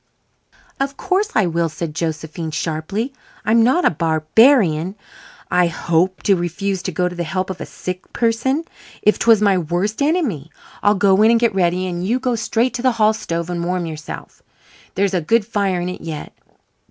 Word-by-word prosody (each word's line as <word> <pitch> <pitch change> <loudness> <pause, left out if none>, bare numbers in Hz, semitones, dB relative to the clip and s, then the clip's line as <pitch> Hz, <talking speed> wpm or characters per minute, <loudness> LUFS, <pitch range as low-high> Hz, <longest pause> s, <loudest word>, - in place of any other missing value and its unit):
"Of 275 0 -2
course 390 +2 0
I 215 - +4
will," 170 -1 0
said 155 0 -5
Josephine 160 0 -4
sharply. 170 - -3 0.3
"I'm 225 +1 +4
not 260 +10 +3
a - - +5
barbarian, 170 - +3 0.6
I 180 -1 +4
hope, 170 +3 0
to 200 - +4
refuse 180 +2 -2
to 185 - -3
go 180 +2 0
to 180 - -5
the 175 -1 -3
help 185 +3 -2
of 185 - -8
a - - -5
sick 185 0 -7
person, 240 +6 0 0.4
if 210 - +3
'twas 225 -3 +4
my 195 -3 +4
worst 175 - -2
enemy. 280 - 0 0.3
I'll 205 +1 +4
go 195 0 +4
in 220 - +6
and 230 0 +4
get 235 -3 +2
ready 180 -1 +1
and 175 -1 -3
you 235 +7 0
go 250 -1 0
straight 230 +2 0
to 240 - -3
the 255 -1 +3
hall 215 -1 +3
stove 170 -6 -4
and 175 -1 -3
warm 180 0 -1
yourself. 155 -2 -8 0.5
There's 195 0 +1
a 180 - +1
good 225 +7 +2
fire 200 -5 0
in 175 - -3
it 180 - -6
yet. 160 -2 -6
185 Hz, 190 wpm, -19 LUFS, 170-225 Hz, 0.6 s, in